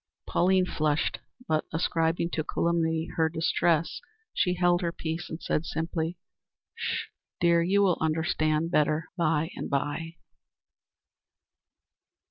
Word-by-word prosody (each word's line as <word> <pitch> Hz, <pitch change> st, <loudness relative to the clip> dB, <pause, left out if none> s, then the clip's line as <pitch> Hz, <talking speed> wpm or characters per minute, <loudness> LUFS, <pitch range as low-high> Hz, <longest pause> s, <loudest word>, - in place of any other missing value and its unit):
Pauline 185 Hz, +1 st, +3 dB
flushed, 155 Hz, -3 st, 0 dB, 0.3 s
but, 155 Hz, -1 st, +1 dB
ascribing 165 Hz, +1 st, 0 dB
the 155 Hz, -, 0 dB
calumny 165 Hz, 0 st, 0 dB
to 160 Hz, -1 st, +2 dB
distress, 165 Hz, 0 st, +1 dB, 0.3 s
she 180 Hz, -1 st, +1 dB
held 175 Hz, 0 st, +3 dB
her 170 Hz, -1 st, 0 dB
peace, 165 Hz, +1 st, -4 dB
and 160 Hz, -, -5 dB
said, 155 Hz, -, 0 dB
simply: 165 Hz, +1 st, -2 dB, 0.6 s
"Sh! -, -, -3 dB, 0.3 s
dear. 170 Hz, -1 st, +4 dB
You 195 Hz, +4 st, +3 dB
will 185 Hz, -3 st, +2 dB
understand 160 Hz, 0 st, +1 dB
better 150 Hz, 0 st, +2 dB
by 160 Hz, -2 st, +1 dB
and -, -, -5 dB
by." 145 Hz, +4 st, -2 dB
165 Hz, 115 wpm, -28 LUFS, 160-170 Hz, 0.6 s, dear